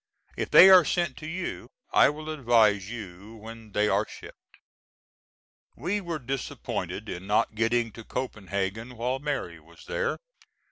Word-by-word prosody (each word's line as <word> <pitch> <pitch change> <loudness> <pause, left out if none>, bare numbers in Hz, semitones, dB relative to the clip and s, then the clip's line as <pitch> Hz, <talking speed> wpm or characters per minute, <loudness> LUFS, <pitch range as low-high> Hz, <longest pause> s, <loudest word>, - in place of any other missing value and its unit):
If - - -3
they 190 - +9
are 185 -2 +9
sent 175 +3 -1
to 155 - -8
you 175 +2 -5 0.2
I - - +6
will 155 +2 -6
advise 115 -8 +3
you 105 -1 -9
when 110 0 -11
they 105 0 +2
are - - +1
shipped. - - -14 1.2
We 185 - -2
were 170 -3 -4
disappointed 135 -1 -5
in 90 +2 -7
not 105 +1 +1
getting 115 +1 0
to 115 +2 -11
Copenhagen 110 -1 -4
while 125 +3 -1
Mary 135 - -4
was 85 +2 -18
there. 485 -2 -2
115 Hz, 145 wpm, -27 LUFS, 105-150 Hz, 1.2 s, they